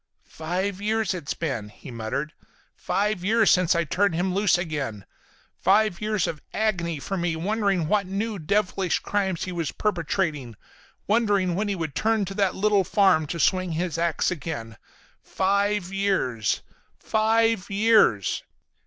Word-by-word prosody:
"Five 185 +5 -3
years 220 0 0
it's 170 -6 -4
been," 125 -10 -3
he 115 +5 -12
muttered. 115 +7 -4 0.4
"Five 205 -2 -1
years 220 +2 +4
since 180 -1 +3
I 170 - +2
turned 185 +3 +1
him 180 +2 0
loose 200 -1 +3
again. 145 - -4 0.5
Five 200 -1 +3
years 210 -3 0
of 150 - -4
agony 175 -8 0
for 195 +7 -4
me, 175 -2 -1
wondering 195 -1 0
what 200 +1 +1
new 205 +2 -3
devilish 190 +1 0
crimes 190 -4 -1
he 185 - -4
was 170 -4 -2
perpetrating, 160 - -2 0.5
wondering 205 -5 +2
when 205 +4 -1
he 200 - -1
would 165 -4 -3
return 220 +7 +1
to 195 - -6
that 195 -2 +1
little 205 0 +3
farm 185 -5 +3
to 170 - -4
swing 185 +1 +1
his 165 0 -2
ax 170 0 +1
again. 145 -10 -5 0.5
Five 200 0 0
years—five 200 - 0
years." 200 - +3
185 Hz, 145 wpm, -25 LUFS, 165-205 Hz, 0.5 s, years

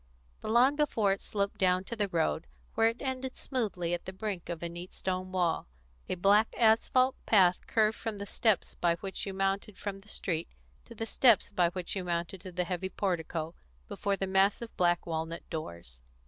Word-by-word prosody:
The - - -7
lawn 245 +6 +5
before 230 -9 +2
it 195 - -1
sloped 200 -1 -2
down 185 -1 +3
to 235 - -5
the 210 -2 0
road, 165 -2 0 0.3
where 225 0 +4
it 230 +4 -2
ended 260 -1 -3
smoothly 200 -10 -2
at 175 - -3
the 190 - -5
brink 190 -2 -4
of 170 -1 -4
a - - -1
neat 175 +2 -8
stone 185 0 -3
wall. 175 - 0 0.4
A - - 0
black 200 +5 +4
asphalt 245 +3 +4
path 185 -4 +4
curved 220 -1 +2
from 225 -2 -4
the 200 - -5
steps 215 0 +1
by 170 -1 +1
which 195 +3 -5
you 195 - -3
mounted 195 +1 -1
from 200 -1 -5
the 205 +2 -17
street 170 -5 -2 0.4
to - - -12
the 225 - -3
steps 230 -2 +4
by 180 -4 +3
which 180 +1 -4
you 190 - -2
mounted 170 +1 -3
to 185 -1 -8
the 180 0 -1
heavy 180 +1 -3
portico 165 -4 -2 0.3
before 200 - -1
the 195 - -2
massive 195 +4 +1
black 175 -1 +2
walnut 165 0 -4
doors. 85 - -6
190 Hz, 195 wpm, -30 LUFS, 175-215 Hz, 0.4 s, lawn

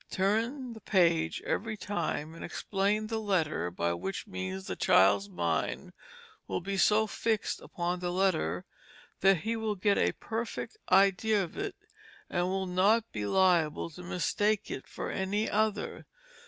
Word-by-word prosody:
Turn 230 +7 0
the 220 - -11
page 170 -5 +2
every 220 0 -2
time 165 -6 -3
and 165 - -9
explain 205 +2 -1
the 220 +1 -2
letter 170 - 0
by 85 -1 -1
which 95 +3 -4
means 95 +1 -5
the - - -4
child's 100 +1 +4
mind 85 -3 -2 0.5
will - - -1
be 195 +3 -3
so 210 +3 +4
fixed 220 0 -1
upon 175 +1 -3
the 175 0 -2
letter 180 - +1 0.5
that 195 -4 +4
he 225 +2 -1
will 220 -2 -1
get 200 +1 +2
a - - +2
perfect 230 - -4 0.2
idea 195 +2 +4
of 170 - -8
it, 400 -1 -3 0.6
and 175 0 +1
will 190 +1 -1
not 200 +5 +2
be 105 -1 -3
liable 170 - +2
to 180 - -10
mistake 190 +4 0
it 130 - -6
for - - -5
any 200 +3 -1
other. 215 0 -1
190 Hz, 155 wpm, -30 LUFS, 160-215 Hz, 0.6 s, child's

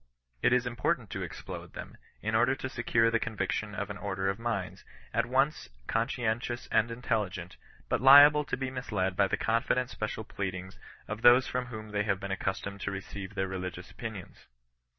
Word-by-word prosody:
It - - +4
is 125 0 +3
important 120 - -1
to - - -4
explode - - -7
them, - - -8 0.3
in 110 +1 -1
order 120 +4 +4
to 130 - -4
secure 115 -2 +2
the 115 - +2
conviction 105 -1 -2
of 100 0 -3
an 105 - -7
order 95 -1 -1
of 95 - -8
minds, 115 -5 -3 0.3
at - - +1
once 135 +4 +1 0.2
conscientious 120 +1 -1
and 110 +1 +3
intelligent, 100 -7 -2 0.3
but - - 0
liable 145 +3 +9
to - - -2
be 130 0 -3
misled 105 -8 -2
by 100 0 +3
the - - 0
confident 120 +2 +1
special 110 0 -4
pleadings 95 -2 -5 0.3
of 105 +1 -5
those 120 +2 +7
from 125 0 -2
whom 110 -2 -8
they 105 0 0
have 100 -2 0
been 100 0 -5
accustomed 100 +1 -3
to - - -2
receive 100 0 -6
their 95 -1 0
religious 90 -1 -5
opinions. 110 -6 -8
110 Hz, 180 wpm, -30 LUFS, 100-120 Hz, 0.3 s, liable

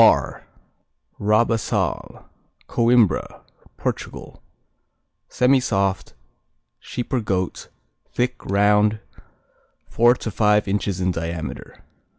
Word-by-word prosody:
R - - +3 0.7
Rabaçal 110 +2 0 0.4
Coimbra, 115 -5 +2 0.4
Portugal - - -5 0.9
Semisoft; 100 -8 +1 0.7
sheep 120 - -6
or 130 - +2
goat; 95 -3 -2 0.4
thick, 125 0 -2
round, 105 +2 +3 0.9
four 120 +2 +4
to 115 - -5
five 105 0 +2
inches 100 -1 -1
in 90 0 +1
diameter. 85 -2 -6
105 Hz, 80 wpm, -22 LUFS, 95-120 Hz, 0.9 s, four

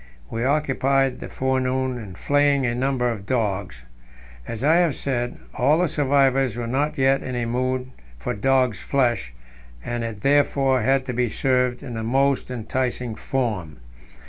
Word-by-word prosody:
We 115 - -2
occupied 135 -1 +1
the - - -7
forenoon 130 -1 -1
in 100 -5 -9
flaying 145 +3 +2
a 120 - 0
number 125 -1 0
of 100 -4 -7
dogs. 100 - -2 0.6
As 115 +1 -5
I 160 +4 +5
have 170 -6 +2
said, 120 -3 -2 0.2
all 140 +5 +3
the 180 +1 +2
survivors 135 -4 +2
were 120 - -3
not 140 +6 -1
yet 135 0 +3
in 130 - -5
a 120 -1 -1
mood 130 +2 -1 0.3
for 60 - -3
dog's 125 -1 +1
flesh, 120 - 0 0.5
and 120 -1 -2
it 110 -3 -5
therefore 135 -1 +3
had 135 +3 +2
to 125 - -3
be 120 0 0
served 125 0 0
in 120 - -6
the 110 -1 -4
most 135 +4 +1
enticing 125 0 -2
form. 105 - -3
130 Hz, 160 wpm, -23 LUFS, 120-135 Hz, 0.6 s, I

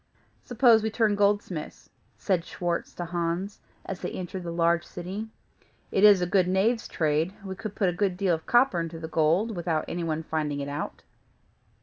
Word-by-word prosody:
"Suppose 235 -2 +4
we 220 - -1
turn 220 -1 +2
goldsmiths?" 200 -5 -1 0.3
said 185 -4 0
Schwartz 175 -1 -3
to 175 - -4
Hans, 170 +3 -3 0.3
as 190 -1 -5
they - - -3
entered 185 +1 -5
the 170 -1 -5
large 170 0 +2
city. 190 +7 -6 0.6
"It 195 - +1
is 205 -3 +7
a - - +2
good 180 0 +2
knave's 210 +6 +1
trade; 160 +4 0
we 190 - -4
can 215 +2 -5
put 200 -1 0
a - - -2
great 185 0 0
deal 190 -2 +2
of 160 -1 -4
copper 240 -7 +4
into 165 0 -4
the 160 0 -6
gold, 165 +8 +1
without 165 -3 -1
any 175 0 -3
one's 160 -1 -2
finding 150 -3 -2
it 140 0 -4
out." 145 +1 -5
180 Hz, 190 wpm, -27 LUFS, 165-205 Hz, 0.6 s, is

